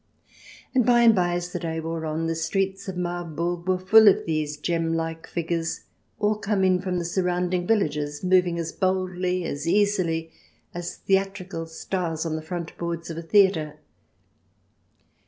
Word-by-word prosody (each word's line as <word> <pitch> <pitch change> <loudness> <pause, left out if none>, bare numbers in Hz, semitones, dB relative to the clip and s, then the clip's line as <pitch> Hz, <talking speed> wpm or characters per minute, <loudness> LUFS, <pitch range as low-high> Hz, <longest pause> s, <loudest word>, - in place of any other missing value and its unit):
And 255 -2 +4
by 240 0 +4
and 230 -1 +7
by, 175 -3 +1
as 175 0 -4
the - - -2
day 165 -1 -3
wore 160 0 -4
on, 155 +1 -2
the 165 - 0
streets 195 +4 -2
of 190 -2 -5
Marburg 175 0 -3
were 185 -1 +2
full 215 +4 +6
of 200 - +5
these 155 -2 -2
gem 165 0 -1
like 165 0 -4
figures, 165 -1 -2 0.4
all 210 0 +1
come 205 -2 0
in 185 -1 +3
from 185 -2 -2
the 170 - -2
surrounding 180 0 0
villages, 150 -8 0
moving 180 -2 +3
as 165 -1 -3
boldly, 185 -1 -1
as 145 0 -4
easily, 170 -5 +1 0.4
as 175 0 -5
theatrical 195 -3 -1
stars 165 -1 -3
on 160 -1 -1
the 155 - -4
front 170 +1 -6
boards 170 -1 -4
of 165 - -7
a - - -5
theatre. 165 -4 +3
175 Hz, 165 wpm, -25 LUFS, 165-190 Hz, 0.4 s, and